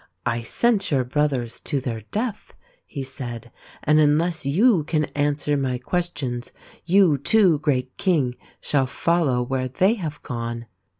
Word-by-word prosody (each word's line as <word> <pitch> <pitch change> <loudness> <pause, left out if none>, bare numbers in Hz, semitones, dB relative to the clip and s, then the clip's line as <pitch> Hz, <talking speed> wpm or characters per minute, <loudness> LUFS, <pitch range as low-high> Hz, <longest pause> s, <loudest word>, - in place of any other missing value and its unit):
" - - -47
I 120 - -3
sent 205 - +1
your 135 -4 +2
brothers 130 -3 -1
to 145 - -2
their 120 -4 -4
death," 215 -1 -4 0.3
he 140 - -5
said, 120 -3 -6 0.2
" - - -23
and 150 +1 +4
unless 155 +1 +2
you 190 - +4
can 155 -1 +1
answer 145 0 0
my 130 -3 -1
questions, 130 -4 -3 0.3
you 175 -5 +4
too, 180 0 +4
great 130 -4 -1
King, 150 -10 +1 0.2
shall 135 -3 +1
follow 145 -3 +1
where 130 +1 -2
they 185 - +2
have 160 -10 -6
gone." 115 -1 -4
145 Hz, 155 wpm, -23 LUFS, 125-170 Hz, 0.3 s, and